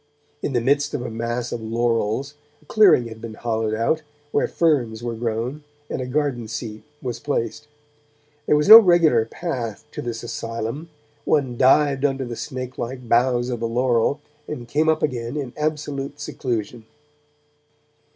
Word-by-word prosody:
In 140 Hz, -, -2 dB
the 120 Hz, -, +2 dB
midst 145 Hz, +4 st, +1 dB
of 125 Hz, -, -3 dB
a -, -, -5 dB
mass 115 Hz, +2 st, -3 dB
of 115 Hz, -, -4 dB
laurels, 115 Hz, +3 st, -1 dB, 0.3 s
a -, -, -26 dB
clearing 195 Hz, -, +5 dB
had 110 Hz, -1 st, -10 dB
been 115 Hz, -1 st, -7 dB
hollowed 110 Hz, -2 st, -1 dB
out, 115 Hz, +8 st, +1 dB, 0.3 s
where -, -, +1 dB
ferns 120 Hz, -9 st, +1 dB
were 120 Hz, -1 st, -2 dB
grown 115 Hz, +5 st, -3 dB, 0.3 s
and -, -, -2 dB
a 125 Hz, -, -4 dB
garden 130 Hz, -4 st, -1 dB
seat 110 Hz, -1 st, -6 dB, 0.2 s
was 125 Hz, -2 st, -4 dB
placed. 145 Hz, 0 st, -3 dB, 0.8 s
There -, -, +4 dB
was 150 Hz, 0 st, +2 dB
no 220 Hz, +2 st, +13 dB
regular 175 Hz, -, +4 dB
path 120 Hz, -, -4 dB
to -, -, -5 dB
this 115 Hz, -1 st, -5 dB
asylum; 115 Hz, +6 st, -5 dB, 0.3 s
one 135 Hz, -5 st, +1 dB
dived 135 Hz, +2 st, +4 dB
under 135 Hz, -2 st, 0 dB
the 120 Hz, -1 st, -5 dB
snake 130 Hz, 0 st, -6 dB
like 125 Hz, +1 st, -5 dB
boughs 120 Hz, +1 st, +2 dB
of 120 Hz, -, -3 dB
the 115 Hz, -, -1 dB
laurel 125 Hz, +4 st, +1 dB, 0.3 s
and 125 Hz, -6 st, -6 dB
came 155 Hz, +5 st, +1 dB
up 160 Hz, 0 st, +1 dB
again 125 Hz, -1 st, -2 dB
in 135 Hz, -4 st, -4 dB
absolute 150 Hz, -2 st, -3 dB
seclusion. 120 Hz, -5 st, -4 dB
125 Hz, 160 wpm, -22 LUFS, 115-145 Hz, 0.8 s, no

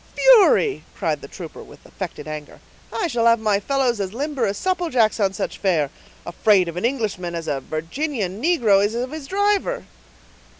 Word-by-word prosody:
"Fury!" 445 Hz, -3 st, +5 dB
cried -, -, -1 dB
the -, -, -9 dB
trooper, -, -, -9 dB
with -, -, -15 dB
affected 170 Hz, -5 st, -7 dB
anger, 155 Hz, -1 st, -7 dB, 0.3 s
"I 440 Hz, -, -1 dB
shall 235 Hz, -8 st, +1 dB
have 230 Hz, 0 st, +5 dB
my 210 Hz, -2 st, +1 dB
fellows 255 Hz, 0 st, 0 dB
as 195 Hz, +2 st, -4 dB
limber 285 Hz, 0 st, -1 dB
as 200 Hz, 0 st, -2 dB
supple 360 Hz, -2 st, -1 dB
jacks 230 Hz, -5 st, +2 dB
on 195 Hz, -2 st, +2 dB
such -, -, -4 dB
fare; 160 Hz, -7 st, +1 dB, 0.3 s
afraid 185 Hz, +1 st, +3 dB
of 170 Hz, -, -5 dB
an 180 Hz, -, -2 dB
Englishman 210 Hz, -9 st, -2 dB
as 165 Hz, -1 st, -5 dB
a 145 Hz, -3 st, -1 dB
Virginian 195 Hz, -, -3 dB
negro 235 Hz, -, +3 dB
is 210 Hz, +2 st, 0 dB
of 250 Hz, +2 st, -3 dB
his 310 Hz, -3 st, -7 dB
driver." 405 Hz, -, 0 dB
225 Hz, 180 wpm, -22 LUFS, 185-295 Hz, 0.3 s, Fury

